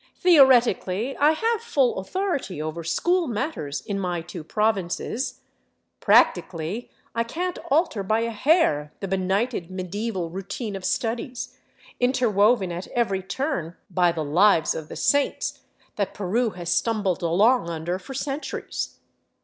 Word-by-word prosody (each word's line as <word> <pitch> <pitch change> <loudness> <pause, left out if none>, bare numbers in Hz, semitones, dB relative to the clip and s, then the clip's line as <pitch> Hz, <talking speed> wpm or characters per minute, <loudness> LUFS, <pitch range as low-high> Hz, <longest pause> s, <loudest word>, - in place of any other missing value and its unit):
Theoretically 255 - +4
I 295 +2 +5
have 450 +6 0
full 275 - +1
authority 280 - -2
over 155 +2 -4
school 345 - +1
matters 205 - -3
in 200 +7 -3
my 180 -3 -2
two 175 -1 -8
provinces; 215 - -1 0.6
practically 175 +8 +2 0.2
I 230 - +1
can't 355 +9 -3
alter 285 - +2
by 215 +4 +1
a 230 0 -1
hair 215 - +2
the 195 - -4
benighted 190 +1 -1
medieval 185 -1 -3
routine 195 +4 -5
of 190 -1 -6
studies, 240 +2 -2 0.4
interwoven 230 -5 +3
at 175 +2 -5
every 200 -6 0
turn 185 - -3 0.2
by 175 -1 +3
the 165 -2 -3
lives 170 +2 +4
of 155 -1 -7
the - - -7
saints, 285 0 +1 0.4
that 200 -2 -2
Peru 215 +5 0
has 175 -3 -3
stumbled 210 -6 0
along 190 +5 +3
under 170 +2 -3
for 265 +8 -9
centuries. 275 +2 -4
205 Hz, 135 wpm, -24 LUFS, 180-255 Hz, 0.6 s, I